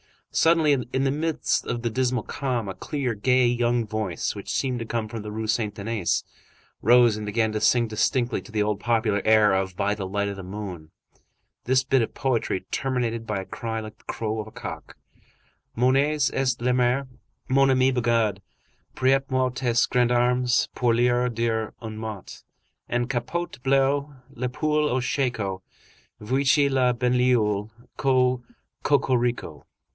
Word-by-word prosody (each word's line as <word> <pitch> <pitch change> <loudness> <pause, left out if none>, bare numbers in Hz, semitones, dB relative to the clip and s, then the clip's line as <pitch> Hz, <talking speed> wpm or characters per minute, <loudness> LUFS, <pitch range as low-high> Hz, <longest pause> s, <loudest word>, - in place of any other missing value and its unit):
Suddenly, 150 -7 +3
in 130 - +1
the 135 - +2
midst 160 +2 -1
of 120 - -2
the 120 - 0
dismal 125 0 0
calm, 130 -5 -3
a - - -4
clear, 135 +2 -3
gay, 125 +4 +2
young 120 -1 +1
voice, 105 -5 -2
which - - -8
seemed 130 -2 -1
to 115 - -4
come 115 -1 -2
from 115 0 -5
the 105 0 -7
Rue 110 +1 -4
Saint 110 -1 -1
Denis, 105 -3 -1 0.6
rose 120 -1 +5
and 105 - -5
began 110 +1 0
to 110 0 -3
sing 120 +2 +3
distinctly, 120 +3 0
to - - -14
the 105 -1 +1
old 105 -1 -1
popular 110 -3 +1
air 110 -2 +5
of 95 -1 -1
"By 100 +2 0
the 100 -2 -5
Light 100 +1 -1
of 100 - -6
the - - -6
Moon," 95 -4 -7 0.8
this 130 +1 +3
bit 135 0 +2
of 115 - -2
poetry, 120 -7 0
terminated 120 -4 -2
by 105 -2 -2
a - - -9
cry 110 +2 -4
like 110 0 -9
the - - -28
crow 110 -1 -3
of 105 - -5
a - - -11
cock:— - - -8 0.8
Mon 125 +2 +3
nez 145 +1 +2
est 130 -3 0
en 125 0 +2
larmes, 125 +2 +1 0.4
Mon 135 +1 +4
ami 130 0 +4
Bugeaud, 115 -5 +1 0.6
Prête 135 +1 +2
moi 130 -1 +1
tes 120 -2 +1
gendarmes 125 0 +2
Pour 120 -2 +2
leur 120 +1 +2
dire 115 -2 -1
un 110 -2 -6
mot. 110 -4 -7 0.5
En 120 0 0
capote 130 +5 -3
bleue, 135 +1 +2 0.3
La 125 +1 -3
poule 150 +3 0
au 130 - +1
shako, 115 -8 -1 0.6
Voici 135 +5 +2
la 130 -2 +2
banlieue! 120 -4 +1 0.3
Co 130 -2 +2 0.4
cocorico! 120 - 0
120 Hz, 165 wpm, -25 LUFS, 110-130 Hz, 0.8 s, rose